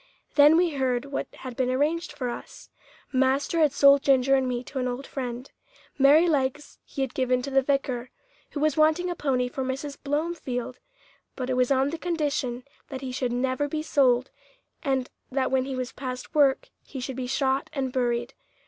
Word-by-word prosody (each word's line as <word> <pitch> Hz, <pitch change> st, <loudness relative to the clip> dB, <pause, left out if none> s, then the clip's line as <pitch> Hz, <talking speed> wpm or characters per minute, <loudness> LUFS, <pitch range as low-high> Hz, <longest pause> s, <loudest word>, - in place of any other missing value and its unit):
Then 295 Hz, +2 st, +7 dB
we 350 Hz, -1 st, +3 dB
heard 260 Hz, -3 st, 0 dB
what 280 Hz, 0 st, -4 dB
had 255 Hz, -2 st, -9 dB
been 255 Hz, 0 st, 0 dB
arranged 305 Hz, +6 st, 0 dB
for 280 Hz, -4 st, -4 dB
us. -, -, -10 dB, 0.4 s
Master 265 Hz, +5 st, +2 dB
had 305 Hz, -3 st, +4 dB
sold 280 Hz, 0 st, +6 dB
Ginger 270 Hz, -1 st, +3 dB
and 265 Hz, -1 st, +3 dB
me 245 Hz, -1 st, -2 dB
to 265 Hz, +1 st, -6 dB
an 255 Hz, -, -1 dB
old 250 Hz, +2 st, -4 dB
friend. 250 Hz, -1 st, -5 dB, 0.5 s
Merrylegs 290 Hz, -1 st, +3 dB
he 275 Hz, -, -6 dB
had 265 Hz, -, -4 dB
given 255 Hz, -1 st, +1 dB
to 275 Hz, -, -5 dB
the 270 Hz, 0 st, +4 dB
vicar, 260 Hz, -3 st, -1 dB, 0.4 s
who 295 Hz, -, -5 dB
was 305 Hz, -1 st, +2 dB
wanting 315 Hz, +3 st, +3 dB
a -, -, -3 dB
pony 255 Hz, -5 st, 0 dB
for 265 Hz, +2 st, -4 dB
Mrs. 270 Hz, +2 st, -4 dB
Blomefield, 285 Hz, -5 st, -3 dB, 0.6 s
but 255 Hz, -1 st, -3 dB
it -, -, +1 dB
was 250 Hz, -1 st, +2 dB
on 270 Hz, +1 st, +2 dB
the 330 Hz, -, -5 dB
condition 290 Hz, -8 st, -2 dB, 0.2 s
that 265 Hz, -1 st, -7 dB
he 260 Hz, -1 st, -5 dB
should 250 Hz, -1 st, -2 dB
never 260 Hz, +3 st, 0 dB
be 305 Hz, +1 st, -3 dB
sold, 260 Hz, -4 st, +2 dB, 0.5 s
and 265 Hz, -3 st, -1 dB, 0.2 s
that 265 Hz, 0 st, 0 dB
when 260 Hz, -1 st, +2 dB
he 270 Hz, -1 st, -4 dB
was 255 Hz, -1 st, -3 dB
past 255 Hz, 0 st, -6 dB
work 295 Hz, -, +3 dB
he 270 Hz, -, -8 dB
should 255 Hz, +1 st, -5 dB
be 255 Hz, -1 st, -4 dB
shot 265 Hz, +1 st, 0 dB
and 265 Hz, -3 st, -3 dB
buried. 240 Hz, -2 st, -1 dB
265 Hz, 190 wpm, -26 LUFS, 255-290 Hz, 0.6 s, Then